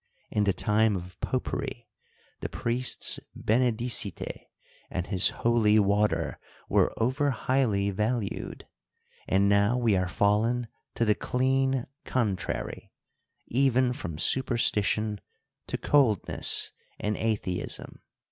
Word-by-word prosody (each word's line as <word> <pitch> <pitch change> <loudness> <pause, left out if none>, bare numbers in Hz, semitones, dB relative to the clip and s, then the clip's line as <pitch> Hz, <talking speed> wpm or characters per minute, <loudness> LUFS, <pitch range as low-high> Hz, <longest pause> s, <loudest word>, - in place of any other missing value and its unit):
— - - -40
In 105 -1 +1
the 100 - +3
time 105 +2 +2
of 90 +1 -7
popery, 120 -2 -3 0.5
the - - -4
priest's 120 +2 0 0.2
henedicite 120 -2 0 0.4
and 90 - -3
his 95 -3 +2
holy 115 -3 +2
water 105 0 +1 0.3
were - - +3
over 130 +5 +1
highly 115 -6 +1
valued; 105 +1 -3 0.6
and 100 +1 +3
now 100 +4 +3
we 115 -5 +2
are 90 -1 +1
fallen 110 +6 +1 0.3
to 115 - +1
the 105 - +4
clean 130 +2 0 0.2
contrary; 105 -8 -2 0.5
even 130 0 +2
from 85 -9 -6
superstition 110 -2 +1 0.5
to - - -2
coldness 130 - +3 0.3
and 105 0 -1
atheism. 105 -5 -3
110 Hz, 110 wpm, -28 LUFS, 100-125 Hz, 0.6 s, the